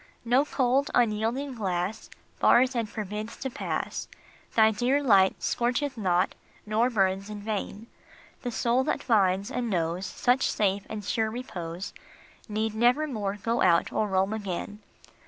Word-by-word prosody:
No 250 Hz, +5 st, +3 dB
cold, 270 Hz, 0 st, +1 dB
unyielding 240 Hz, +4 st, +1 dB
glass 190 Hz, -3 st, -3 dB, 0.3 s
Bars 255 Hz, +2 st, +5 dB
and 230 Hz, -3 st, -1 dB
forbids 210 Hz, +1 st, -5 dB
to 265 Hz, -, -4 dB
pass; -, -, -3 dB, 0.5 s
Thy 220 Hz, -1 st, +6 dB
dear 255 Hz, +6 st, +1 dB
light 195 Hz, -7 st, +4 dB
scorcheth 250 Hz, +3 st, 0 dB
not, 185 Hz, -4 st, +1 dB, 0.3 s
nor 220 Hz, +3 st, +2 dB
burns 195 Hz, -3 st, 0 dB
in 210 Hz, -1 st, -6 dB
vain; 210 Hz, 0 st, -4 dB, 0.6 s
The 245 Hz, -, -3 dB
soul 240 Hz, +2 st, +1 dB
that -, -, -1 dB
finds 195 Hz, -4 st, +2 dB
and 240 Hz, -2 st, -2 dB
knows 175 Hz, 0 st, -1 dB
Such 250 Hz, +2 st, +1 dB
safe 200 Hz, -1 st, 0 dB
and 210 Hz, -2 st, -6 dB
sure 220 Hz, +1 st, 0 dB
repose 185 Hz, -7 st, -6 dB, 0.6 s
Need 215 Hz, +1 st, -1 dB
nevermore 235 Hz, -3 st, +1 dB
go 230 Hz, +2 st, 0 dB
out 170 Hz, -2 st, +3 dB
or 215 Hz, -, 0 dB
roam 190 Hz, +1 st, +1 dB
again. 205 Hz, 0 st, -5 dB
220 Hz, 140 wpm, -27 LUFS, 195-245 Hz, 0.6 s, Thy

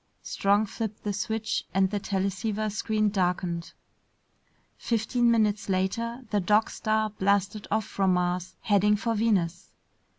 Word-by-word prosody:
Strong 200 Hz, +2 st, +2 dB
flipped 215 Hz, 0 st, -5 dB
the 205 Hz, -, -1 dB
switch 220 Hz, +2 st, -2 dB
and 190 Hz, 0 st, +3 dB
the 205 Hz, -, -1 dB
teleceiver 200 Hz, +2 st, -2 dB
screen 215 Hz, 0 st, 0 dB
darkened. 180 Hz, -3 st, -1 dB, 1.0 s
Fifteen 235 Hz, +1 st, +1 dB
minutes 210 Hz, -3 st, +2 dB
later, 230 Hz, +7 st, -1 dB
the 205 Hz, -, +2 dB
Dog 210 Hz, +4 st, +2 dB
Star 215 Hz, 0 st, 0 dB
blasted 200 Hz, +1 st, 0 dB
off 215 Hz, 0 st, 0 dB
from 190 Hz, -2 st, +1 dB
Mars, 180 Hz, 0 st, -1 dB
heading 210 Hz, 0 st, +3 dB
for 230 Hz, +2 st, -1 dB
Venus. 195 Hz, -6 st, 0 dB
205 Hz, 130 wpm, -27 LUFS, 190-220 Hz, 1.0 s, and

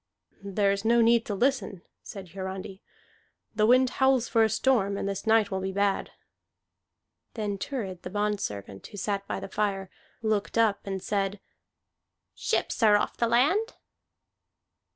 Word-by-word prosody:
"There 200 Hz, 0 st, +1 dB
is 200 Hz, 0 st, -2 dB
no 235 Hz, +1 st, +4 dB
need 230 Hz, 0 st, +4 dB
to 205 Hz, -, -2 dB
listen," 235 Hz, -6 st, 0 dB, 0.2 s
said 195 Hz, -3 st, -9 dB
Hiarandi. 190 Hz, +1 st, -6 dB, 0.7 s
"The 215 Hz, -1 st, +2 dB
wind 255 Hz, +1 st, +5 dB
howls 265 Hz, -2 st, +4 dB
for 225 Hz, -, +2 dB
a 220 Hz, -, +3 dB
storm, 200 Hz, -5 st, +1 dB
and -, -, -3 dB
this 195 Hz, +2 st, -4 dB
night 220 Hz, -2 st, +4 dB
will 190 Hz, -, -1 dB
be 190 Hz, 0 st, -2 dB
bad." 200 Hz, 0 st, 0 dB, 1.3 s
Then 210 Hz, -3 st, -2 dB
Thurid 190 Hz, -7 st, -4 dB
the -, -, -7 dB
bondservant, 185 Hz, -, -3 dB
who 205 Hz, -, -11 dB
sat 200 Hz, 0 st, -2 dB
by -, -, -3 dB
the 195 Hz, -, -6 dB
fire, 195 Hz, -2 st, -2 dB, 0.3 s
looked 215 Hz, 0 st, -1 dB
up 220 Hz, -3 st, +2 dB
and 195 Hz, -1 st, -4 dB
said, 200 Hz, -1 st, -1 dB, 0.9 s
"Ships -, -, -1 dB
are 210 Hz, -2 st, +6 dB
off -, -, -2 dB
the 235 Hz, -, +1 dB
land." 295 Hz, -, +2 dB
205 Hz, 150 wpm, -27 LUFS, 195-230 Hz, 1.3 s, are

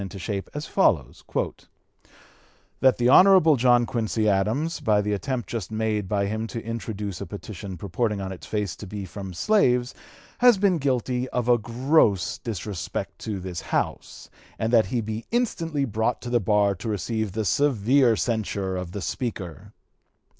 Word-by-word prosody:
271) -, -, -3 dB
into 95 Hz, 0 st, -7 dB
shape 100 Hz, +1 st, -4 dB
as 150 Hz, +1 st, -4 dB
follows: 80 Hz, -, +1 dB, 1.6 s
"That 130 Hz, -1 st, +4 dB
the 120 Hz, -, +2 dB
Hon. 180 Hz, 0 st, +7 dB
John 120 Hz, -1 st, +4 dB
Quincy 110 Hz, -2 st, -1 dB
Adams, 110 Hz, +11 st, +1 dB
by 110 Hz, -8 st, +2 dB
the 105 Hz, 0 st, 0 dB
attempt 125 Hz, +3 st, -3 dB
just 110 Hz, -6 st, -4 dB
made 110 Hz, -2 st, -1 dB
by 100 Hz, -1 st, +1 dB
him 110 Hz, +2 st, -2 dB
to 115 Hz, -1 st, -6 dB
introduce 105 Hz, -4 st, -5 dB
a -, -, -5 dB
petition 100 Hz, -2 st, -7 dB
purporting 105 Hz, +4 st, -2 dB
on 95 Hz, -1 st, -4 dB
its 95 Hz, -, -9 dB
face 105 Hz, -7 st, -2 dB
to 105 Hz, -, -9 dB
be 100 Hz, 0 st, -6 dB
from 95 Hz, +1 st, -7 dB
slaves, 125 Hz, -, +2 dB, 0.5 s
has 245 Hz, -4 st, +6 dB
been 190 Hz, -3 st, +2 dB
guilty 130 Hz, -2 st, -1 dB
of 125 Hz, -1 st, -2 dB
a 120 Hz, -1 st, +4 dB
gross 115 Hz, -, +2 dB
disrespect 105 Hz, -4 st, -5 dB
to 105 Hz, -3 st, -4 dB
this 90 Hz, -2 st, -5 dB
House, -, -, -3 dB, 0.3 s
and 110 Hz, +2 st, -1 dB
that 110 Hz, -4 st, +5 dB
he 120 Hz, +4 st, -1 dB
be 110 Hz, +1 st, -5 dB
instantly 165 Hz, -, 0 dB
brought 110 Hz, +1 st, -1 dB
to 120 Hz, -, -5 dB
the 120 Hz, -, +3 dB
bar 105 Hz, -1 st, +2 dB
to 100 Hz, +4 st, -6 dB
receive 110 Hz, 0 st, -2 dB
the 110 Hz, 0 st, -2 dB
severe 125 Hz, +2 st, +3 dB
censure 100 Hz, -4 st, -2 dB
of 90 Hz, -1 st, -5 dB
the 100 Hz, -, -4 dB
Speaker." 100 Hz, -, -5 dB
110 Hz, 170 wpm, -25 LUFS, 100-125 Hz, 1.6 s, Hon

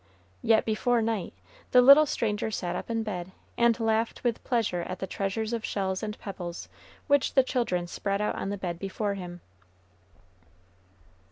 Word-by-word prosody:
Yet, 220 Hz, -1 st, +3 dB
before 235 Hz, +2 st, +1 dB
night, 225 Hz, -4 st, -1 dB, 0.4 s
the 250 Hz, -, +6 dB
little 280 Hz, +4 st, +9 dB
stranger 215 Hz, -4 st, -1 dB
sat 180 Hz, -4 st, -3 dB
up -, -, -5 dB
in 225 Hz, -1 st, 0 dB
bed, 185 Hz, -4 st, -5 dB, 0.2 s
and 235 Hz, 0 st, +3 dB
laughed 225 Hz, 0 st, 0 dB
with 240 Hz, -2 st, -1 dB
pleasure 225 Hz, -8 st, 0 dB
at 185 Hz, +2 st, -5 dB
the 190 Hz, -, -4 dB
treasures 200 Hz, +4 st, -2 dB
of 230 Hz, -1 st, -2 dB
shells 190 Hz, -3 st, -2 dB
and 210 Hz, -1 st, -4 dB
pebbles 175 Hz, -4 st, -6 dB, 0.4 s
which 285 Hz, -2 st, +2 dB
the 265 Hz, -, +6 dB
children 230 Hz, -10 st, -1 dB
spread 200 Hz, +3 st, -2 dB
out 210 Hz, -, 0 dB
on -, -, -4 dB
the 205 Hz, -, -3 dB
bed 175 Hz, -3 st, -4 dB
before 200 Hz, +2 st, -2 dB
him. 175 Hz, -3 st, -7 dB
210 Hz, 165 wpm, -28 LUFS, 190-230 Hz, 0.4 s, little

